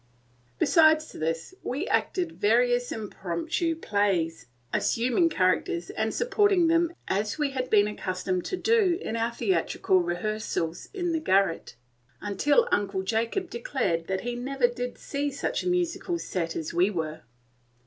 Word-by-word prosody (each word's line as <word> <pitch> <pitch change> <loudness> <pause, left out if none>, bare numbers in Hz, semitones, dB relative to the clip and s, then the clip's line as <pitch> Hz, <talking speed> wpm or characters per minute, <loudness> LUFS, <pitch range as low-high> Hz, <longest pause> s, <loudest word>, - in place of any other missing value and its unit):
Besides 315 - +4
this, 165 - -3
we 285 +10 -3
acted 355 -3 0
various 245 +1 +2
impromptu 210 - -2
plays, 195 - 0 0.3
assuming 250 +8 +2
characters 185 - 0
and 220 0 -1
supporting 410 - +3
them 335 +1 +3 0.2
as 205 +4 -1
we 295 -2 0
had 255 -1 -3
been 205 -1 +5
accustomed 185 -3 -2
to 370 - -2
do 430 -6 +3
in 225 - -4
our 230 +1 0
theatrical 190 -4 +1
rehearsals 175 -1 -2
in 355 -4 -2
the 325 - 0
garret, 195 - +1 0.6
till 460 +12 +4
Uncle 195 -2 0
Jacob 230 - -1
declared 230 - -1
that 190 0 -1
he 245 0 -3
never 260 +1 0
did 245 0 -5
see 285 0 -2
such 280 0 -2
a - - -3
musical 350 0 -1
set 170 - -3
as 160 -1 -4
we 180 +3 +3
were. 160 -5 -4
230 Hz, 140 wpm, -27 LUFS, -, 0.6 s, been